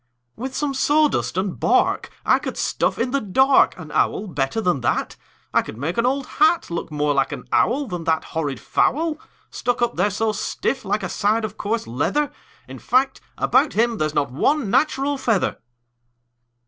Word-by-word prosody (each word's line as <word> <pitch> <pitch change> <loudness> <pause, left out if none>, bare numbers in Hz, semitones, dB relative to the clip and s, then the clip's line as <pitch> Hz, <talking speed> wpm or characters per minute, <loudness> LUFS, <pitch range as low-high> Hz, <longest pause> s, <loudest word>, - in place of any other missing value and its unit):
"With 260 +3 -6
some 290 -2 -1
sawdust 295 - +1
and 190 -1 -2
bark - - +2 0.2
I - - +4
could - - -5
stuff - - 0
in 245 +2 -1
the 275 0 +1
dark 265 +7 +4
An 160 -4 -9
owl 205 - +1
better 145 +1 -2
than 180 -10 0
that. 120 - -1 0.4
I - - +4
could 110 - -9
make 155 +8 -3
an 235 - +2
old 270 +1 0
hat 345 - +2
Look 170 - -3
more 150 -1 0
like 135 -1 +1
an - - -6
owl 275 +5 +2
Than 180 -7 -5
that 160 -1 +1
horrid 145 -6 -3
fowl, 315 +1 0 0.3
Stuck 245 - -1
up 240 - -1
there 205 - +2
so 220 +2 0
stiff 260 +5 -2
like 205 +1 -1
a - - -1
side 215 +4 0
of 210 -1 -7
coarse 220 +2 -2
leather. 145 - -1 0.4
In - - -9
fact, 265 +1 +1 0.2
about - - +2
him 230 0 +1
there's 155 0 -1
not 140 -2 0
one 245 - +1
natural 275 +1 +1
feather." 225 -8 0
220 Hz, 185 wpm, -22 LUFS, 165-270 Hz, 0.4 s, I